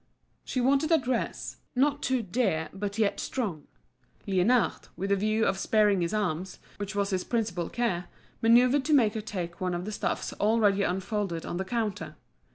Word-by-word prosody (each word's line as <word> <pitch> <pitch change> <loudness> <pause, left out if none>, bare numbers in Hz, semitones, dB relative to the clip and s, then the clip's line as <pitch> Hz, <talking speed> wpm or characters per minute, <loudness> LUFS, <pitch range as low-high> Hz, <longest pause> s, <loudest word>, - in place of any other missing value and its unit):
She 255 - -2
wanted 275 +5 +2
a 325 - +7
dress, 255 -4 -2 0.2
not 285 +3 +2
too 255 -2 0
dear 180 -6 0
but 200 +1 -4
yet 215 -3 +1
strong. 190 - -3 0.6
Liénard, 200 +6 +2
with 195 +2 -3
the - - +5
view 215 +3 +1
of 190 0 0
sparing 210 -3 +3
his 170 0 0
arms, 185 -3 -2 0.2
which 205 0 -5
was 200 0 0
his 185 -1 0
principal 210 -8 -1
care, 190 -8 -1 0.4
manoeuvred 245 +4 +5
to 310 - +2
make 225 -6 +4
her 220 - -3
take 180 -5 -5
one 180 -1 0
of 175 +1 -4
the 215 - -4
stuffs - - -2
already 205 -2 +2
unfolded 190 -2 -2
on 175 - -4
the 190 - -2
counter. 215 -2 -3
210 Hz, 175 wpm, -28 LUFS, 185-235 Hz, 0.6 s, a